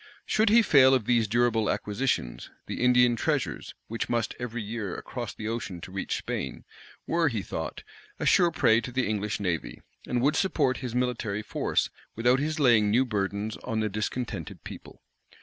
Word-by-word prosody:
Should 220 Hz, 0 st, +2 dB
he 230 Hz, +2 st, +6 dB
fail 135 Hz, -7 st, +6 dB
of 120 Hz, -5 st, -1 dB
these 115 Hz, -2 st, +2 dB
durable 115 Hz, -1 st, +2 dB
acquisitions, 105 Hz, -, -2 dB, 0.2 s
the -, -, -5 dB
Indian 125 Hz, -1 st, +5 dB
treasures, -, -, -2 dB
which 115 Hz, +1 st, -4 dB
must 115 Hz, -2 st, 0 dB
every 120 Hz, -2 st, -4 dB
year 105 Hz, -3 st, -4 dB
cross 120 Hz, -5 st, -5 dB
the 110 Hz, -, -5 dB
ocean 110 Hz, -6 st, -4 dB
to 90 Hz, -, -9 dB
reach 95 Hz, -, -2 dB
Spain, 65 Hz, -, -5 dB, 0.4 s
were, 165 Hz, -1 st, +2 dB
he 110 Hz, -8 st, -1 dB
thought, 80 Hz, -, -5 dB, 0.4 s
a -, -, -2 dB
sure 175 Hz, -1 st, +5 dB
prey 115 Hz, -8 st, +3 dB
to 125 Hz, -, -6 dB
the 130 Hz, +1 st, 0 dB
English 105 Hz, -1 st, -2 dB
navy, 90 Hz, -5 st, -2 dB, 0.3 s
and 125 Hz, -, 0 dB
would 145 Hz, +6 st, +2 dB
support 145 Hz, -9 st, +1 dB
his 125 Hz, -2 st, -5 dB
military 120 Hz, -4 st, -1 dB
force -, -, -1 dB, 0.2 s
without 125 Hz, +3 st, +3 dB
his 155 Hz, +2 st, -2 dB
laying 115 Hz, -7 st, +5 dB
new 125 Hz, +5 st, +3 dB
burdens 105 Hz, -1 st, -2 dB
on 115 Hz, -3 st, -3 dB
the 110 Hz, 0 st, 0 dB
discontented 110 Hz, +4 st, -4 dB
people. -, -, -11 dB
120 Hz, 175 wpm, -27 LUFS, 105-130 Hz, 0.4 s, he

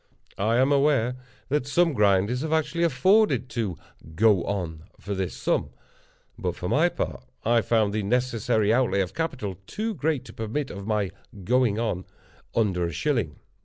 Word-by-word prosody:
I 110 Hz, +4 st, +2 dB
am 130 Hz, +3 st, +3 dB
aware 140 Hz, -4 st, +3 dB, 0.3 s
that 140 Hz, -1 st, 0 dB
some 170 Hz, +2 st, +3 dB
grinders 105 Hz, +2 st, +2 dB
have 155 Hz, +1 st, -3 dB
actually 160 Hz, +2 st, +1 dB
afforded 185 Hz, -, +3 dB
to 105 Hz, -8 st, -2 dB, 0.4 s
"go 105 Hz, -2 st, +4 dB
on" 85 Hz, -5 st, -4 dB
for 100 Hz, -, -4 dB
this 95 Hz, -2 st, -3 dB
sum; -, -, 0 dB, 0.7 s
but -, -, -2 dB
for -, -, -5 dB
my -, -, +3 dB
part, -, -, -4 dB, 0.2 s
I 115 Hz, +1 st, +4 dB
found 110 Hz, -2 st, +1 dB
the 110 Hz, -, 0 dB
necessary 115 Hz, -1 st, +1 dB
outlay 120 Hz, -5 st, +2 dB
of 95 Hz, 0 st, -3 dB
capital 125 Hz, -, -3 dB
too 220 Hz, +1 st, -3 dB
great 155 Hz, -5 st, -1 dB
to -, -, -11 dB
permit 115 Hz, +6 st, -3 dB
of 100 Hz, 0 st, -7 dB
my 105 Hz, -3 st, 0 dB, 0.3 s
"going 120 Hz, 0 st, +2 dB
on" 110 Hz, -6 st, -2 dB, 0.5 s
under 95 Hz, -6 st, +1 dB
a 85 Hz, -, -3 dB
shilling. 100 Hz, -, -1 dB
115 Hz, 165 wpm, -26 LUFS, 100-140 Hz, 0.7 s, go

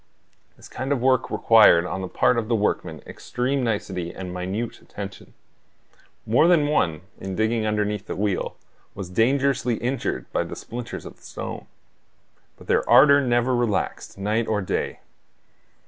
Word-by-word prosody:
This -, -, -14 dB
kind 135 Hz, +2 st, -5 dB
of 140 Hz, -, +2 dB
work 130 Hz, 0 st, +2 dB
required 105 Hz, -7 st, +6 dB
on 90 Hz, +1 st, -4 dB
the 95 Hz, -, -3 dB
part 120 Hz, +6 st, +2 dB
of 110 Hz, -, -4 dB
the 115 Hz, -, +1 dB
workmen 105 Hz, -1 st, -1 dB
extreme 130 Hz, +2 st, -2 dB
nicety 95 Hz, -6 st, -2 dB
and 90 Hz, -1 st, -7 dB
minute 95 Hz, +6 st, -4 dB
attention. 100 Hz, -1 st, -9 dB, 0.9 s
More 120 Hz, +9 st, +4 dB
than 170 Hz, -4 st, +4 dB
one, 85 Hz, -, +1 dB, 0.2 s
in 95 Hz, -1 st, -5 dB
digging 110 Hz, +1 st, 0 dB
underneath 105 Hz, -1 st, -1 dB
the -, -, -4 dB
wheel, 100 Hz, -1 st, -1 dB, 0.4 s
was 95 Hz, -2 st, -7 dB
dangerously 130 Hz, +3 st, +2 dB
injured 125 Hz, +4 st, -2 dB
by -, -, 0 dB
the -, -, -7 dB
splinters 120 Hz, 0 st, -7 dB
of -, -, -11 dB
stone. -, -, -7 dB, 0.9 s
But -, -, -15 dB
their -, -, +1 dB
ardor 140 Hz, +4 st, +7 dB
never 125 Hz, 0 st, +1 dB
relaxed, 115 Hz, -6 st, -2 dB
night 105 Hz, +3 st, 0 dB
or 110 Hz, -1 st, +1 dB
day. 95 Hz, -, -3 dB
110 Hz, 150 wpm, -24 LUFS, 100-125 Hz, 0.9 s, ardor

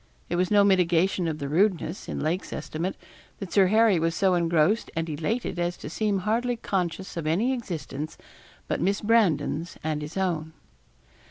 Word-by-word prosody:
It -, -, -1 dB
was 180 Hz, +1 st, +1 dB
no 205 Hz, -1 st, +5 dB
mitigation 180 Hz, -2 st, +3 dB
of 155 Hz, -2 st, -2 dB
the 140 Hz, -2 st, -4 dB
rudeness, 180 Hz, +3 st, 0 dB
in -, -, -3 dB
Lake's 170 Hz, +5 st, -2 dB
estimate, 170 Hz, +5 st, -3 dB, 0.4 s
that 195 Hz, -3 st, -7 dB
Sir 195 Hz, -2 st, +5 dB
Harry 215 Hz, -2 st, +4 dB
was 165 Hz, 0 st, 0 dB
so 190 Hz, -2 st, +3 dB
engrossed 170 Hz, +4 st, +2 dB
and 165 Hz, 0 st, -1 dB
elated 175 Hz, +6 st, -2 dB
as 175 Hz, 0 st, -1 dB
to 150 Hz, -, -8 dB
seem 205 Hz, 0 st, 0 dB
hardly 235 Hz, +5 st, 0 dB
conscious 190 Hz, -4 st, -3 dB
of 160 Hz, -2 st, -3 dB
any 210 Hz, +12 st, +2 dB
existence 155 Hz, -, -5 dB, 0.5 s
but -, -, -1 dB
Miss 195 Hz, +4 st, +1 dB
Brandon's 180 Hz, -7 st, +1 dB
and 155 Hz, -1 st, -1 dB
his 150 Hz, +5 st, -7 dB
own. 165 Hz, -4 st, -1 dB
180 Hz, 170 wpm, -26 LUFS, 160-200 Hz, 0.5 s, no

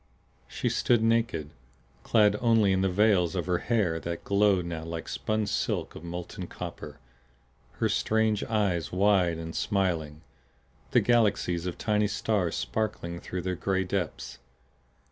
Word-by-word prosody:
She -, -, -3 dB
stood 120 Hz, -2 st, +2 dB
naked, 115 Hz, -10 st, +1 dB, 0.5 s
clad 105 Hz, -2 st, +4 dB
only 115 Hz, -4 st, +4 dB
in 95 Hz, 0 st, +2 dB
the 95 Hz, -, +2 dB
veils 95 Hz, -2 st, +3 dB
of 90 Hz, -, -1 dB
her 90 Hz, -1 st, 0 dB
hair 100 Hz, -9 st, 0 dB
that 85 Hz, 0 st, -5 dB
glowed 100 Hz, -3 st, +2 dB
now 85 Hz, -2 st, -5 dB
like 85 Hz, 0 st, -6 dB
spun 110 Hz, 0 st, -1 dB
silk 100 Hz, -, -2 dB
of -, -, -10 dB
molten 85 Hz, 0 st, -6 dB
copper, 75 Hz, -1 st, -8 dB, 0.8 s
her -, -, 0 dB
strange 110 Hz, -1 st, +1 dB
eyes 100 Hz, -7 st, 0 dB
wide 90 Hz, -3 st, +3 dB
and 80 Hz, 0 st, -7 dB
smiling, 80 Hz, -6 st, -1 dB, 0.7 s
the -, -, +4 dB
galaxies 100 Hz, -7 st, +2 dB
of 90 Hz, -, -4 dB
tiny 105 Hz, -1 st, +1 dB
stars 105 Hz, -3 st, -1 dB
sparkling 100 Hz, -6 st, -3 dB
through 90 Hz, 0 st, -5 dB
their 95 Hz, 0 st, -1 dB
gray 95 Hz, +2 st, 0 dB
depths. 85 Hz, -9 st, -4 dB
95 Hz, 145 wpm, -28 LUFS, 85-105 Hz, 0.8 s, clad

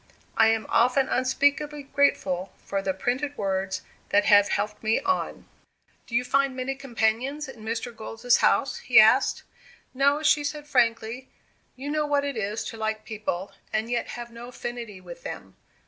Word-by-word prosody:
I 225 Hz, -, +5 dB
am 225 Hz, 0 st, +1 dB
often 255 Hz, +3 st, +3 dB
unspeakably 285 Hz, +3 st, +1 dB
grateful 195 Hz, -10 st, +1 dB
for 195 Hz, -1 st, -2 dB
the 195 Hz, -, 0 dB
printed 255 Hz, +9 st, -2 dB
words 190 Hz, -1 st, -2 dB, 0.3 s
that 205 Hz, 0 st, +3 dB
have 205 Hz, -1 st, +6 dB
helped 210 Hz, 0 st, -2 dB
me 220 Hz, 0 st, +2 dB
on." 375 Hz, -1 st, -2 dB, 0.6 s
"Do 230 Hz, -, -5 dB
you 240 Hz, -, +3 dB
find 275 Hz, +1 st, +1 dB
many 260 Hz, +1 st, -2 dB
companions 265 Hz, +2 st, -1 dB
in 235 Hz, -5 st, -11 dB
Mr. 230 Hz, +2 st, -4 dB
Gold's 225 Hz, +2 st, +1 dB
house?" -, -, +2 dB
he -, -, +6 dB
asked. -, -, +5 dB, 0.5 s
"No," 280 Hz, +3 st, +2 dB
she 300 Hz, -1 st, +4 dB
said, 295 Hz, 0 st, -4 dB
frankly. 240 Hz, -2 st, 0 dB, 0.5 s
"You 275 Hz, +3 st, -5 dB
know 305 Hz, 0 st, 0 dB
what 285 Hz, -1 st, +1 dB
it 280 Hz, -2 st, -3 dB
is 215 Hz, 0 st, -2 dB
to 225 Hz, -, -9 dB
like 220 Hz, 0 st, -3 dB
people, 205 Hz, -3 st, -4 dB, 0.2 s
and 220 Hz, +2 st, -1 dB
yet 240 Hz, -, -1 dB
have 240 Hz, 0 st, -7 dB
no 235 Hz, +1 st, -9 dB
affinity 240 Hz, -4 st, -7 dB
with -, -, -11 dB
them. -, -, -8 dB
240 Hz, 165 wpm, -26 LUFS, 220-275 Hz, 0.6 s, have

